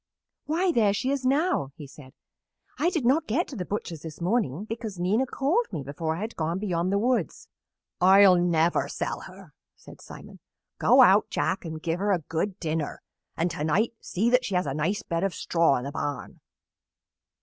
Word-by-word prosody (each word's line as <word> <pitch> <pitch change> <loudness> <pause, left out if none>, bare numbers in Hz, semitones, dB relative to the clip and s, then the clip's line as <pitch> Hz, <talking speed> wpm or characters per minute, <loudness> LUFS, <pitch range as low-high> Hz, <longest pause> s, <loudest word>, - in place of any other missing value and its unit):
"Why, 345 +4 +1
there 215 -9 +3
she 255 +6 -1
is 270 -2 -1
now!" 285 - +1
he 150 - -9
said. 135 -1 -14 0.7
"I 335 - +3
did 325 -9 -2
not 295 +6 +2
get 285 +11 0
to 275 - -8
the 180 -5 -4
butcher's 170 -6 -4
this 160 -1 -9
morning 185 - -1
because 220 -3 -6
Nina 205 +9 +1
called 320 - 0
me 145 - -4
before 160 +4 -3
I 170 - -6
had 220 +2 -5
gone 165 +2 -2
beyond 185 -3 -1
the 200 - +2
woods. 235 -3 -1 0.5
"I'll 190 +1 +7
never 175 -1 +2
sell - - -3
her," - - -13 0.2
said - - -15
Simon. - - -12 0.4
"Go - - +6
out, - - +5
Jack, 185 -1 -1
and 160 -1 -5
give 165 +1 -1
her 205 +1 0
a - - +2
good 180 +5 -2
dinner, 160 -2 -3 0.3
and 170 +1 0
to 150 - -4
night 195 +10 +1
see 205 +6 -1
that 250 0 +4
she 200 - -3
has 180 - +1
a 135 - -2
nice 160 +8 -1
bed 170 +1 -2
of 195 -2 -1
straw 165 -5 +2
in 125 - -5
the 140 - -5
barn." 145 -3 -5
185 Hz, 195 wpm, -26 LUFS, 160-235 Hz, 0.7 s, I'll